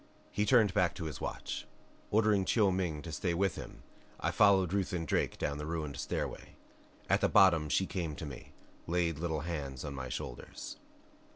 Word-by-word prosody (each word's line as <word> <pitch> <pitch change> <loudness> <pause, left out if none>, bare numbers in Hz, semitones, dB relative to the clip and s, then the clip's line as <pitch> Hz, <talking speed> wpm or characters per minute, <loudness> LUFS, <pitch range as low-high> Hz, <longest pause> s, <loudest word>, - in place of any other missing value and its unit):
He 105 +1 0
turned 110 -7 +5
back 90 -1 +2
to 90 - -5
his 75 -4 -5
watch. - - -4 0.4
Ordering 105 -2 +3
Chiu 100 0 +3
Ming 90 -5 -1
to 85 - -6
stay 85 +3 -1
with 95 -1 +1
him - - -9 0.4
I - - 0
followed 95 -3 +4
Ruth 100 -1 0
and 85 -3 -2
Drake - - 0
down 70 0 -2
the 75 - -4
ruined 80 -4 -3
stairway. - - -4 0.5
At - - +3
the - - +3
bottom 85 -7 +5
she 95 +7 +2
came 85 -5 -3
to 80 - -6
me, 70 -4 -9 0.4
laid 85 -2 0
little 80 -3 -1
hands 75 -5 -4
on 70 - -4
my 65 -2 -5
shoulders. - - -6
85 Hz, 185 wpm, -32 LUFS, 75-95 Hz, 0.5 s, turned